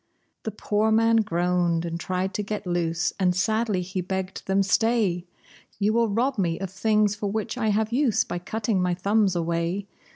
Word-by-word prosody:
The - - -3
poor 215 +1 0
man 225 +1 +4
groaned 175 -4 +1
and 170 0 -4
tried 185 +2 -2
to - - -1
get 210 0 -4
loose, 175 -1 0
and 180 -2 +2
sadly 215 0 +1
he 185 +1 -3
begged 190 +1 -4
them, 195 +1 +3
"Stay! 200 -4 +1 0.5
You 210 +1 +1
will 230 -1 +2
rob 240 +4 0
me 170 -3 +1
of 190 -1 -4
things 210 +1 +2
for 205 -1 -3
which 220 +2 -2
I 235 -3 -1
have 215 +2 +1
use 255 -5 +3
by 175 - -4
cutting 210 +1 -1
my 180 -1 +1
thumbs 200 +1 +2
away! 170 +3 -1
195 Hz, 185 wpm, -25 LUFS, 180-220 Hz, 0.5 s, man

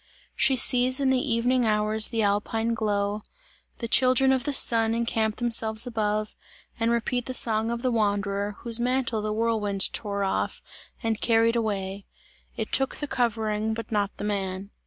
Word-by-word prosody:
She 265 - +3
sees 255 +1 +4
in 270 -1 +2
the 265 +1 0
evening 245 +2 +1
hours 215 0 +1
the 230 -2 -1
alpine 220 +3 0
glow 205 -1 -1 0.6
the 230 - -5
children 255 +2 +3
of 265 0 0
the 290 - 0
Sun 230 -4 +4
encamp 225 -2 -1
themselves 225 -1 +2
above, 215 -3 -2 0.4
and 230 0 +1
repeat 235 +1 -1
the 255 - -2
song 225 -1 +2
of 235 +1 -4
the 255 - +1
wanderer, 205 -2 -1
whose 235 -1 +1
mantle 245 -2 -1
the 215 0 -3
whirlwind 210 -3 0
tore 200 -2 -3
off, 190 - -2 0.4
and 225 -1 -2
carried 230 0 +2
away: 200 -3 -3 0.5
"it - - -4
took 270 0 0
the 295 - -4
covering 220 -4 -1
but 230 +1 -7
not 205 -2 0
the - - -7
man." 195 -1 -4
225 Hz, 165 wpm, -25 LUFS, 210-240 Hz, 0.6 s, sees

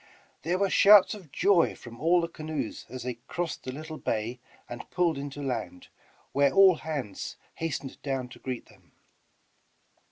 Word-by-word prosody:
There 175 +5 0
were 195 0 +1
shouts 205 -1 +7
of 185 -9 -11
joy 195 -4 +3
from 115 0 -12
all 175 +2 +4
the 170 - -1
canoes 155 -7 -5
as 130 -2 -7
they 125 -2 -4
crassed 175 -2 -4
the 130 - -3
little 155 +3 -7
bay 115 +3 -2 0.3
and 120 - -8
pulled 175 -3 +1
into 140 +1 -6
land, 115 -8 -4 0.4
where 140 0 +3
all 190 -3 +7
hands 140 -12 -5 0.2
hastened 145 -4 -4
down 135 -3 -2
to - - -13
greet 130 -2 -5
them. - - -23
145 Hz, 160 wpm, -28 LUFS, 125-170 Hz, 0.4 s, shouts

